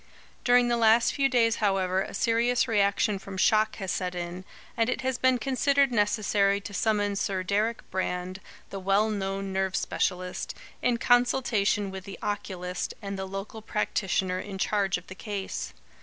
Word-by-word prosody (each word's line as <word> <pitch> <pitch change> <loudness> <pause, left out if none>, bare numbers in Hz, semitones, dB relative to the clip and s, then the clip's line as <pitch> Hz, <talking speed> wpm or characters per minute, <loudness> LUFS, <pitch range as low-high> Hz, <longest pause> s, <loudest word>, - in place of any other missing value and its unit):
During 245 0 +5
the 240 0 +1
last 230 +1 +4
few 275 -1 +2
days, 230 -3 +3
however, 190 -2 +1
a - - -5
serious 235 +4 +2
reaction 205 -1 +2
from 195 0 -8
shock 215 +2 +3
has 190 -3 -4
set 180 -1 -2
in, 175 +1 -5 0.3
and 230 0 +1
it 265 - -1
has 260 -1 -1
been 260 -1 +4
considered 275 +1 +2
necessary 205 -2 +2
to 200 0 -9
summon 205 -1 +1
Sir 195 -1 -1
Deryck 215 +4 0
Brand, 185 0 -2 0.3
the 195 - -5
well 195 +3 +2
known 195 -1 -3
nerve 190 0 0
specialist, 180 -1 -2 0.3
in 245 -1 +2
consultation 235 -5 +2
with 190 -1 -8
the 195 - -8
oculist 185 -3 -3
and 200 -2 -5
the 190 0 -4
local 195 +3 -6
practitioner 190 -3 -1
in 195 0 -6
charge 195 -2 +1
of 180 - -12
the - - -9
case. 200 0 -5
200 Hz, 165 wpm, -27 LUFS, 190-230 Hz, 0.3 s, During